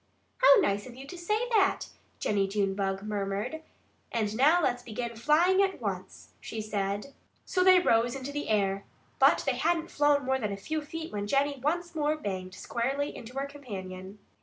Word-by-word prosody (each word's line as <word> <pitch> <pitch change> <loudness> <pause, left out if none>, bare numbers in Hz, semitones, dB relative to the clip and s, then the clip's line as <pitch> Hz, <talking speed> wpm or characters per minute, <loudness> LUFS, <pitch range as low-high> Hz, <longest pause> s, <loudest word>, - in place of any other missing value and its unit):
"How - - +8
nice 205 - 0
of 240 - -11
you 265 +2 -9
to 320 - -9
say 425 +7 -1
that!" 410 -5 +2 0.3
Jennie 200 -2 +1
Junebug 195 -1 -1
murmured. 210 +7 -3 0.5
"And 215 -2 -1
now 295 +8 +5
let's 245 -7 0
begin 235 0 -5
flying 325 - +4
at 385 -1 0
once!" - - -6
she 225 - -6
said. 205 +4 -3 0.3
So 365 - +1
they 370 0 +8
rose 235 -8 +3
into 270 +1 -5
the 290 +1 -4
air. 200 -2 +1 0.4
But - - +5
they - - 0
hadn't 335 0 0
flown 290 -1 +3
more 265 0 +1
than 210 -4 -2
a 200 - -4
few 310 +10 -3
feet 320 0 -7
when 205 0 -3
Jennie 280 +2 +1
once 345 +4 -1
more 305 -1 0
banged 185 -8 -5
squarely 270 +8 -2
into 245 +3 -9
her 275 - -1
companion. 195 -9 -8
255 Hz, 180 wpm, -29 LUFS, 205-310 Hz, 0.5 s, How